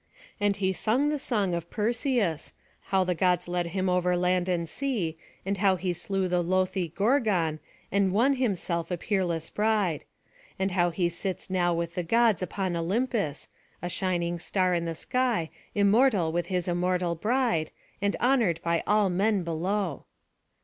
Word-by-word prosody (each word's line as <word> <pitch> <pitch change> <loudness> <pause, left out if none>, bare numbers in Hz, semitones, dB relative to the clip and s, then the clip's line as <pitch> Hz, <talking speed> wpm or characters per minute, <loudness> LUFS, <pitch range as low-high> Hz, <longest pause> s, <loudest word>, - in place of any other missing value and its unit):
And 205 -1 +2
he 190 -1 0
sung 245 +10 +1
the 300 -1 -1
song 205 -9 0
of 170 0 -3
Perseus, 225 - -1 0.3
how 190 -1 +2
the 180 0 0
Gods 180 0 +1
led 175 -1 -1
him 185 +2 -1
over 180 0 +2
land 180 0 +1
and 170 -2 0
sea, 210 - -2 0.3
and 195 0 -1
how 195 -2 +4
he 180 0 -2
slew 190 +2 -1
the 180 0 +1
loathly 185 +1 0
Gorgon, 195 - +1 0.3
and 200 -1 +2
won 255 +8 +3
himself 180 -8 -1
a 180 - -1
peerless 170 -4 -1
bride; 210 -7 +1 0.5
and 190 0 0
how 175 -1 +2
he 175 +1 0
sits 185 +2 -4
now 175 -2 +2
with 170 0 -3
the 180 - -1
Gods 225 +2 +3
upon 185 0 -2
Olympus, 195 - -1 0.3
a 175 - -4
shining 175 -2 -1
star 185 +2 +1
in 170 -1 0
the 165 -1 -3
sky, 235 -5 0 0.2
immortal 205 -3 +3
with 175 +1 -1
his 180 -1 -1
immortal 180 0 0
bride, 210 -3 0 0.3
and 200 0 +1
honoured 235 -10 +2
by 170 0 +1
all 210 -1 +4
men 195 +2 +1
below. 170 0 -2
185 Hz, 165 wpm, -27 LUFS, 170-210 Hz, 0.5 s, how